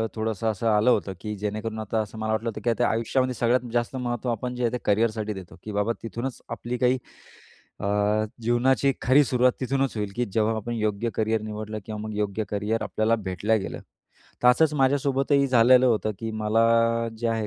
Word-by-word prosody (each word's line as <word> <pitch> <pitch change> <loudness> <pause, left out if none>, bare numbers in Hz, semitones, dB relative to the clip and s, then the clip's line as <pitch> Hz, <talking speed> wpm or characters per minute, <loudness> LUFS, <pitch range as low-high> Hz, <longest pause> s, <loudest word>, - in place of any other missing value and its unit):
थोडंसं 110 -1 -2
असं 110 +1 -2
आलं 110 +2 +4
होतं, 100 -5 +1
की 105 +1 -5
जेणेकरून 105 +2 -4
आता 110 +1 -2
असं 110 +1 -8
मला 110 0 -2
वाटलं 110 +2 0
होतं, 110 - -7
की 120 - +1
आता 120 +1 +2
आयुष्यामध्ये 130 +3 0
सगळ्यात 120 +2 +1
जास्त 120 +2 -1
महत्त्व 120 -1 -2
आपण 125 +2 -3
जे 125 - -3
आहे 115 - +2
ते 125 - -1
करिअरसाठी 110 0 +1
देतो, 95 -3 -10
की 110 - -6
बाबा, 105 +2 0
तिथूनच 120 +3 -5
आपली 120 +1 -4
काही 125 +1 +2 0.8
अ, - - -4 0.6
जीवनाची 125 +4 +2
खरी 135 +3 +5
सुरुवात 125 0 +3
तिथूनच 135 0 -1
होईल, 105 -2 -2
की 120 - 0
जेव्हा 110 +1 +2
आपण 120 +2 -4
योग्य 110 0 -1
करिअर 110 0 0
निवडलं 110 0 -5
किंवा 110 -1 -6
मग 110 0 -5
योग्य 105 +1 -1
करिअर 105 +2 -1
आपल्याला 110 +1 +1
भेटल्या 100 +4 +1
गेलं, 100 - -5 0.6
तर 125 - +6
असंच 150 +5 +4
माझ्यासोबतही 140 0 +2
झालेलं 125 0 +5
होतं, 110 -3 +1
की 115 -1 -4
मला 110 +1 +1 0.6
जे 115 0 -1
आहे 115 -1 -1
115 Hz, 190 wpm, -25 LUFS, 110-125 Hz, 0.8 s, तर